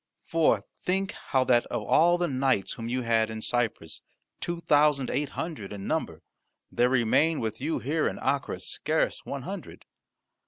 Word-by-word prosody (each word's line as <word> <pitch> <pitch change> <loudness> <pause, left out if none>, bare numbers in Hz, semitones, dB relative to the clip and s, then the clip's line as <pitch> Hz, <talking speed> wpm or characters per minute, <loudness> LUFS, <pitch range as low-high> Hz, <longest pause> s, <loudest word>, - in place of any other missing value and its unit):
For 155 -11 +2
think 190 +2 -1
how 130 -2 0
that 120 -2 +3
of 120 -3 -3
all 170 +11 +4
the 175 0 0
knights 130 - +1
whom 115 0 -6
you 125 +1 -1
had 115 -1 +2
in 110 0 -5
Cyprus, 110 -8 -2 0.4
two 175 0 -3
thousand 145 -4 +3
eight 145 -1 -1
hundred 155 - -4
in 100 -1 -6
number, - - -2 0.5
there 125 +1 +3
remain 130 +6 +3
with 110 +1 -3
you 155 +4 0
here 155 +5 0
in - - -3
Acre - - -1
scarce - - -1
one - - -4
hundred. - - -8
130 Hz, 165 wpm, -27 LUFS, 115-160 Hz, 0.5 s, all